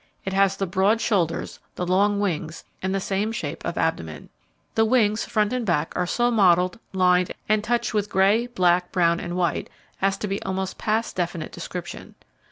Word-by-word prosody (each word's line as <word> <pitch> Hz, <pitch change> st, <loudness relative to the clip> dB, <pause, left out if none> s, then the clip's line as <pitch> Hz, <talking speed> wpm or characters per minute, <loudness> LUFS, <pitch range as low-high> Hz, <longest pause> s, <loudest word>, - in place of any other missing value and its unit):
It 190 Hz, -, -3 dB
has 195 Hz, 0 st, +3 dB
the 195 Hz, -, -1 dB
broad 195 Hz, +4 st, +2 dB
shoulders, 175 Hz, -7 st, -1 dB, 0.2 s
the 180 Hz, -, -2 dB
long 200 Hz, +3 st, +2 dB
wings, 165 Hz, -5 st, -2 dB, 0.2 s
and 190 Hz, -, -1 dB
the 195 Hz, -, 0 dB
same 200 Hz, +3 st, -1 dB
shape 160 Hz, -10 st, -5 dB
of 170 Hz, -, -4 dB
abdomen. 80 Hz, -, -2 dB, 0.4 s
The 225 Hz, -, +3 dB
wings, 220 Hz, -2 st, +2 dB
front 215 Hz, 0 st, 0 dB
and 250 Hz, -1 st, -1 dB
back, 165 Hz, -6 st, 0 dB
are 180 Hz, -1 st, 0 dB
so 240 Hz, +5 st, +1 dB
mottled, 180 Hz, -3 st, +3 dB
lined, 180 Hz, -1 st, +3 dB, 0.2 s
and 215 Hz, 0 st, +2 dB
touched 235 Hz, +1 st, 0 dB
with 210 Hz, -1 st, 0 dB
grey, 200 Hz, +5 st, +3 dB
black, 180 Hz, -6 st, +2 dB
brown 170 Hz, -2 st, +2 dB
and 175 Hz, 0 st, -4 dB
white, 175 Hz, -2 st, -1 dB, 0.3 s
as 195 Hz, 0 st, +2 dB
to 210 Hz, -, -4 dB
be 195 Hz, 0 st, -3 dB
almost 190 Hz, 0 st, -3 dB
past 220 Hz, +2 st, -1 dB
definite 170 Hz, -3 st, -3 dB
description. -, -, -7 dB
190 Hz, 180 wpm, -24 LUFS, 175-210 Hz, 0.4 s, has